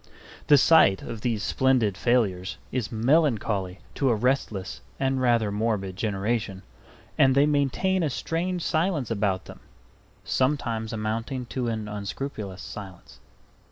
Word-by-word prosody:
The 145 - +7
sight 135 -10 +5
of 110 - -7
these 110 -3 -1
splendid 125 -7 +2
failures 100 -4 0
is 120 -4 -2
melancholy 110 - +1
to 135 - +1
a 120 - +3
restless 110 -5 -1 0.2
and 135 -1 0
rather 120 -4 +2
morbid 105 -3 -1
generation; 105 0 -2 0.6
and 130 -1 +5
they 140 +1 +5
maintain 150 +6 +1
a 160 - +1
strange 170 +5 -2
silence 160 - 0
about 100 -4 0
them - - -11 0.6
sometimes 120 -5 -1
amounting 115 +4 -3
to 125 -2 -1
an 110 -2 -3
unscrupulous 105 -1 -5
silence. 95 -4 -10
115 Hz, 125 wpm, -26 LUFS, 105-135 Hz, 0.6 s, The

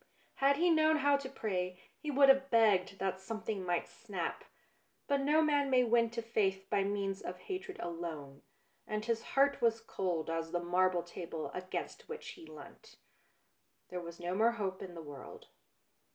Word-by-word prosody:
Had 275 +1 +4
he 345 +2 +4
known 315 -1 +5
how 285 -1 +4
to 275 -1 -6
pray 185 -8 -3 0.2
he 300 - -5
would 280 0 +6
have 270 0 +5
begged 210 -5 +4
that 190 0 -2
something 215 0 -4
might 175 -1 0
snap. 195 -7 -5 0.6
But 280 -1 +2
no 300 +3 +4
man 290 -2 +2
may 255 -1 +5
win 235 -1 +3
to 230 0 -4
faith 195 -4 0
by 200 - +3
means 195 -1 -2
of 180 - -5
hatred 380 - -6
alone, 160 -5 -6 0.5
and 215 0 -2
his 230 -1 0 0.2
heart 280 +1 +4
was 230 -1 +3
cold 185 -7 -2
as 165 0 -3
the 175 - +1
marble 175 0 +2
table 170 -2 -6
against 185 0 -5
which 465 0 -6
he 335 -3 -10
leant. - - -13 0.9
There 180 -1 -4
was 170 0 -9
no 175 +1 -3
more 225 +4 +3
hope 195 -4 -3
in 180 -3 -7
the 165 - -7
world. 145 -3 -10
205 Hz, 175 wpm, -34 LUFS, 180-270 Hz, 0.9 s, would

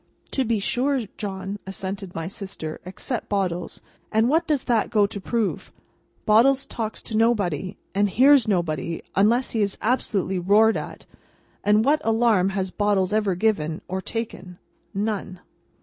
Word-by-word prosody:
"To 265 - +1
be 230 -2 +1
sure, 260 +6 0
John," 195 0 -5
assented 195 -1 -5
my 165 - -3
sister; 185 -4 -7
"except 220 +6 -5
Bottles. 180 -4 -2 0.3
And 225 +2 +3
what 325 +3 +2
does 295 -4 +1
that 235 -3 +1
go 210 -2 +4
to 200 0 -5
prove? 230 0 -2 0.5
Bottles 260 +6 +4
talks 220 -2 -5
to 220 - -5
nobody, 200 -5 +1 0.2
and 205 +1 +2
hears 265 +3 +5
nobody 170 -4 -1
unless 230 +6 +3
he 225 - 0
is 200 -1 0
absolutely 200 -6 0
roared 210 +5 +4
at, - - -6 0.6
and 210 +2 +4
what 300 +2 +3
alarm 225 -4 +3
has 190 -1 -2
Bottles 205 -2 +1
ever 210 -4 +1
given, 170 -6 0
or 190 +1 -3
taken! 190 -5 -5 0.4
None." 200 -3 -2
205 Hz, 150 wpm, -24 LUFS, 190-230 Hz, 0.6 s, hears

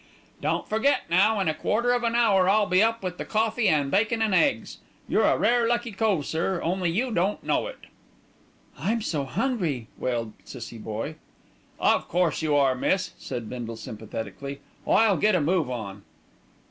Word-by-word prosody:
"Don't - - -1
forget 220 +7 +2
now, 205 +5 +4
in 190 - 0
a 155 - +2
quarter 235 +9 0
of 245 0 0
an 235 0 0
hour, 200 -6 +4
I'll 210 +1 +4
be 185 0 +3
up 225 -1 +1
with 180 -1 -4
the - - -2
coffee 220 +1 0
an' 145 -3 +1
bacon 215 +3 +2
an' 220 -3 +1
eggs. 280 +8 +1 0.3
You're - - +2
a - - +3
rare 240 -1 +3
lucky 240 0 0
cove, 195 -7 0
sir, 170 +4 -1
only 180 +1 0
you 235 +9 0
don't 195 +1 0
know - - 0
it." - - -8 1.0
"I'm 225 +2 -1
so 150 -8 -2
hungry," 160 - -2
wailed 115 -3 -2
Cissie 115 -2 -9
Boye. 110 +9 -5 0.6
"Of - - +2
course 175 -2 +1
you 155 -2 +1
are, 135 -2 +4
miss," 185 +9 0
said 120 -3 -5
Bindle 115 -1 -6
sympathetically. 110 +6 -7 0.3
"I'll 220 -4 +4
get 210 -1 +3
a - - +3
move 160 -1 +1
on." 105 -5 -5
185 Hz, 175 wpm, -26 LUFS, 140-220 Hz, 1.0 s, now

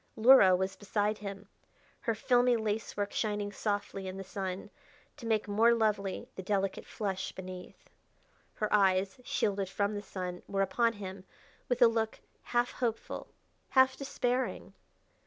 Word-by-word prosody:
Luhra 220 -5 +8
was 190 +1 -2
beside 205 +1 -1
him, 200 -1 -7 0.5
her 230 - -1
filmy 245 +2 +3
lacework 210 -1 -2
shining 205 -2 -1
softly 205 -2 -3
in 185 0 -5
the 195 - -5
sun, 190 -1 -5 0.4
to 235 - -8
make 220 -1 +1
more 225 +3 +4
lovely 210 -4 0
the - - -6
delicate 195 0 -1
flush 195 -3 -3
beneath. 185 -1 -10 0.6
Her 215 -1 -1
eyes, 195 +2 +3
shielded 200 -5 0
from 200 +2 0
the 205 - -3
sun, 180 -3 -5
were 195 -1 +1
upon 230 +4 +2
him 190 -2 -8 0.4
with 245 0 +4
a - - +9
look 225 -1 -1 0.3
half 240 0 +1
hopeful, 235 -3 -3 0.4
half 260 0 +5
despairing. 260 -2 -2
205 Hz, 140 wpm, -31 LUFS, 195-230 Hz, 0.6 s, a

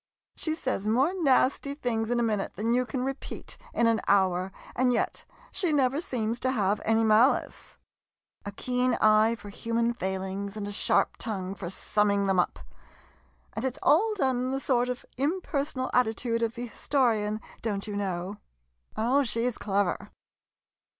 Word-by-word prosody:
She 315 -1 -2
says 255 -9 -2
more 260 +10 +3
nasty 280 0 +2
things 230 -5 -1
in 240 0 +1
a - - +2
minute 210 -3 -1
than 225 +3 0
you 250 0 +1
can 255 -1 -2
repeat 270 +1 -5 0.2
in 235 - +1
an 230 -1 +3
hour, 190 -1 +2 0.2
and 250 0 +3
yet 240 - -1 0.3
she 355 -4 0
never 275 0 +2
seems 235 -6 -2
to 260 - 0
have 205 -3 +1
any 225 0 +2
malice. 220 +5 +2 0.7
A 205 - -5
57 250 +5 -4
MODERN 250 - +3
MONOLOGUES 255 - +2
keen - - +5
eye 215 +2 +5
for 205 -2 -11
human 230 +3 -1
failings, 190 0 -4
and 205 -1 -4
a - - -4
sharp 205 - +1
tongue 195 -4 -3
for 185 -3 -6
summing 200 +1 +1
them 190 -2 +2
up— 180 - +1 1.0
and - - -4
it 260 -1 -1
's - - -11
all 425 +8 +4
done 265 -9 +1
in 250 +1 -1
the 270 +1 -1
sort 250 -2 +1
of 250 0 -4
impersonal 280 -3 -1
attitude 230 -1 +1
of 230 0 -1
the 240 +1 -4
historian, 220 -4 0 0.2
don't 205 -3 -2
you 210 -2 -5
know. 190 0 -3 0.6
Oh, 245 +6 +3
she's 240 -2 -1
clever. 200 -1 -1
230 Hz, 175 wpm, -28 LUFS, 205-255 Hz, 1.0 s, keen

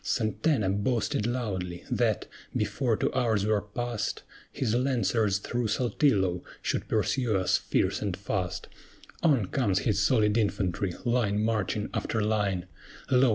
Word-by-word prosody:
SANTANA 110 -1 +1
boasted 115 -2 0
loudly 95 -8 -3
that, - - +1 0.3
before 120 -6 0
two - - 0
hours 115 -6 +1
were 105 -1 +2
past, 110 +1 -3 0.3
His 120 -5 -1
Lancers 120 -5 +2
through 120 +3 -2
Saltillo 105 -6 +1 0.2
should - - -1
pursue 120 -6 +1
us 95 -1 +2
fierce - - 0
and 100 -4 -2
fast: 95 -2 -3 0.5
On 140 - +3
comes 100 -3 +1
his 105 -3 +1
solid 105 0 +3
infantry, 95 -3 -1
line 110 -4 +1
marching 110 -1 0
after 110 - -1
line; 105 -4 0 0.5
Lo! 130 0 +5
110 Hz, 130 wpm, -28 LUFS, 100-120 Hz, 0.5 s, Lo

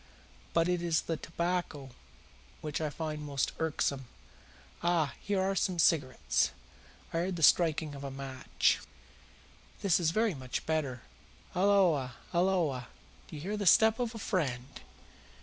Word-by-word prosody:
But 165 0 +3
it 180 -1 0
is 165 -2 +1
the 165 - -2
tobacco 165 -4 -3 0.7
which 150 0 -3
I 155 - 0
find 155 0 -4
most 140 -2 -1
irksome. 145 -4 -1 0.8
Ah, 170 -6 +1
here 200 -1 0
ARE 190 +1 +1
some 185 -1 0
cigarettes." 145 -5 +2 0.6
I - - 0
heard 180 +2 -1
the 165 - -3
striking 160 -2 +4
of 140 0 -8
a 140 - -4
match. 135 -1 0 1.0
"That 190 -3 +3
is 165 -3 +2
very 215 +4 +1
much 130 -3 -5
better. 145 -6 -1 0.5
Halloa! 180 -10 +3 0.2
halloa! 170 -9 +1 0.4
Do - - -9
I - - -6
hear 200 +6 -3
the 205 -2 -1
step 220 +5 +6
of 240 -2 -2
a - - -4
friend?" 140 - -2
160 Hz, 145 wpm, -31 LUFS, 140-180 Hz, 1.0 s, step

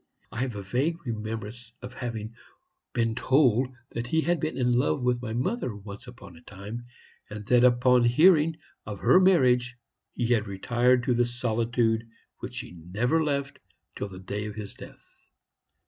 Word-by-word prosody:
I - - -6
have 125 -3 -2
a 100 - -5
vague 145 - -1
remembrance 110 0 -5
of 125 0 -8
having 115 -3 -5 0.6
been 115 -1 0
told 130 0 +3 0.2
that 115 +1 -4
he 160 +5 +2
had 175 0 +1
been 155 +2 -3
in 125 -2 +2
love 125 +1 +1
with 125 -1 +1
my 120 -3 -5
mother 130 - -2
once 100 +4 -10
upon 100 -8 -12
a 80 - -15
time, 105 +7 -9 0.4
and 105 0 -7
that 125 +2 +4 0.2
on 125 -1 +5
hearing 155 +5 +5 0.3
of 105 -1 -6
her 185 - +6
marriage 125 -10 +3 0.4
he 120 - -1
had 110 -2 0
retired 120 +6 +2
into 125 0 +1
the 120 0 +2
solitude 115 -1 0 0.3
which - - -6
he - - -11
never 105 - -1
left 140 -2 -2 0.4
till 105 - -4
the 95 - -10
day 100 +3 -5
of 105 - -7
his 105 -2 -7
death. - - -13
120 Hz, 170 wpm, -27 LUFS, 110-130 Hz, 0.6 s, her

